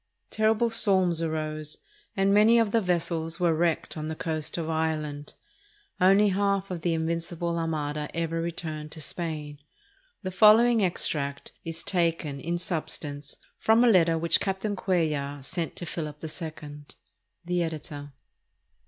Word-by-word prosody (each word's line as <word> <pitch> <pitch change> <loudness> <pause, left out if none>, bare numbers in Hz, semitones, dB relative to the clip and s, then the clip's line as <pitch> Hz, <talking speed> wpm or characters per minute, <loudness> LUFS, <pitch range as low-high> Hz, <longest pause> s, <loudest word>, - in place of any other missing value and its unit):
Terrible 220 +2 +2
storms 190 -6 +3
arose, 155 -1 -3 0.4
and 195 +1 +3
many 215 +3 +6
of 225 -3 +3
the 230 - +3
vessels 165 -3 -1
were 175 -2 +3
wrecked 165 0 0
on 155 -1 -4
the 160 - -4
coast 155 -1 -2
of 165 -2 -3
Ireland. 155 -2 -2 0.6
Only 195 +3 +5
half 195 0 0
of 175 -2 -4
the 170 0 +1
Invincible 170 +1 -2
Armada 150 -2 -2
ever 165 0 -1
returned 155 -2 -5
to 160 - -9
Spain. 150 -2 -4 0.6
The 185 - -3
following 220 +4 +6
extract 140 -6 -2
is 165 0 -5
taken, 165 -5 0
in 170 +4 -2
substance, 150 -5 -4 0.2
from 225 +2 +4
a 245 - +6
letter 165 -4 +4
which 165 0 +2
Captain 195 +1 -2
Cuellar 155 -7 -1
sent 170 +1 -3
to 175 - -5
Philip 155 -2 -5
11. 155 -2 -7 0.6
The 175 0 0
Editor. 150 -3 -5
165 Hz, 140 wpm, -27 LUFS, 155-185 Hz, 0.6 s, many